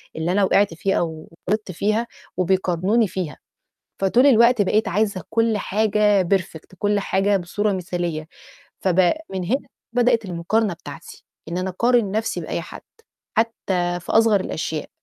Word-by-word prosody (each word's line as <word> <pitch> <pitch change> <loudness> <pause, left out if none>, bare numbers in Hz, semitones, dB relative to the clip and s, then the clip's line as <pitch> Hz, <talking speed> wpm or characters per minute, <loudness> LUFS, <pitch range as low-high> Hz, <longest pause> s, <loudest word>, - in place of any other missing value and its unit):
اللي 160 +2 -1
أنا 200 +1 +2
وِقِعت 195 -1 +3
فيها 195 +4 0
أو 160 -2 -4 0.2
غلطت 215 -2 -1
فيها 215 +6 0 0.3
وبيقارنوني 185 +4 +2
فيها، 175 -6 -4 0.6
فطول 235 +8 +4
الوقت 235 -3 +5
بقيت 210 +3 +1
عايزة 200 -1 0
كل 225 -1 +2
حاجة 210 -1 +2
perfect، 185 -1 -8
كل 205 0 +1
حاجة 200 +1 +1
بصورة 200 +3 -1
مثالية. 175 -4 -3 0.5
فب 185 -1 +2 0.3
من 190 -1 -3
هنا 250 +10 -1 0.2
بدأت 240 -2 +2
المقارنة 185 +3 0
بتاعتي، 145 -3 -11 0.2
إن 170 +2 -3
أنا 185 +1 -2
أقارن 235 +1 +2
نفْسي 220 +1 -1
بأي - - -3
حد، - - -10 0.5
حتى 185 -6 0
في 180 - -6
أصغر 225 -3 +4
الأشياء. 160 -3 -4
195 Hz, 145 wpm, -22 LUFS, 175-220 Hz, 0.6 s, الوقت